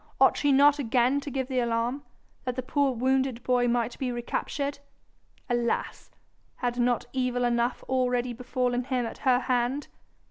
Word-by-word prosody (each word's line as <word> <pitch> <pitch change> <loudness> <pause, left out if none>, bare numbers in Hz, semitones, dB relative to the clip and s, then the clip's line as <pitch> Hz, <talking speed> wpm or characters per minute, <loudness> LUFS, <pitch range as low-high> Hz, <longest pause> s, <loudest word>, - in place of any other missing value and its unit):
Ought - - +6
she 290 - +2
not 285 +2 +5
again 250 +1 +2
to 285 - -6
give 265 -1 -2
the 260 -2 0
alarm, 235 +3 0 0.4
that 250 -1 -3
the 255 - -3
poor 280 +1 +1
wounded 260 0 0
boy 245 -1 +2
might 240 0 0
be 255 -2 -1
recaptured? 280 +4 -3 0.7
Alas! 240 -2 -1 0.5
had 245 -1 -2
not 245 0 +1
evil 250 -1 0
enough 240 +1 0
already 250 -1 0
befallen 245 0 -1
him 250 -2 -1
at 230 - -7
her 255 -1 +3
hand? 250 +3 -1
250 Hz, 155 wpm, -27 LUFS, 240-265 Hz, 0.7 s, Ought